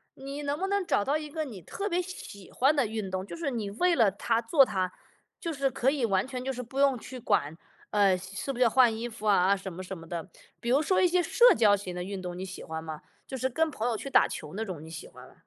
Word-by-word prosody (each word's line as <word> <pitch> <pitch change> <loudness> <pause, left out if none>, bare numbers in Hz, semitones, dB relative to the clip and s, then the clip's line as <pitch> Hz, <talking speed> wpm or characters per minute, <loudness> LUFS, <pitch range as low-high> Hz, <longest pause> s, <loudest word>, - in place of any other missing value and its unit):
你 275 +2 -6
能 285 +1 -1
不 385 - -1
能 400 -2 0
找 205 - +1
到 290 +3 +2
一 305 -1 -7
个 310 +1 -3
你 210 -9 -9
特 400 - -4
别 360 -1 +1
喜 270 - -9
欢 275 +4 +3
的 275 -4 +3
运 215 -3 -4
动， 185 0 -3
就 - - -8
是 325 -5 -2
你 215 -4 -3
为 345 - +2
了 225 -5 +5
它 225 +4 0
做 270 +4 +5
它， 185 -4 -1 0.5
就 335 -2 -3
是 275 -1 +1
可 260 +1 +1
以 280 -5 -2
完 195 +2 +1
全 255 -2 -5
就 265 - -1
是 250 -1 -5
不 265 +4 -6
用 275 -3 +4
去 255 +2 -9
管， 150 -7 +1 0.4
呃， 200 -3 +4
是 195 +8 -5
不 250 - -7
是 250 - +4
要 230 - +5
换 240 -2 +5
衣 235 +1 -3
服 220 -2 -6
啊， 195 0 +5
什 190 -1 -6
么 185 +2 -7
什 190 +1 -6
么 165 0 -12
的。 175 +2 -5 0.3
比 235 - -4
如 275 +4 +4
说 370 +4 +2
一 365 - +5
些 355 +1 +2
社 485 +8 +6
交 210 -3 +5
型 190 -3 -6
的 180 - -3
运 195 0 -5
动， 180 -1 -5
你 185 - -5
喜 185 -1 -7
欢 160 0 -5
吗？ 155 -1 -7 0.3
就 265 - -5
是 260 +2 0
跟 320 +5 +1
朋 240 -4 -3
友 235 - 0
去 275 - -5
打 - - +5
球 - - -7
那 225 +1 -2
种 170 -6 -6
你 160 - -10
喜 165 - -8
欢 - - -14
吗？ - - -21
230 Hz, 305 characters per minute, -29 LUFS, 190-280 Hz, 0.5 s, 社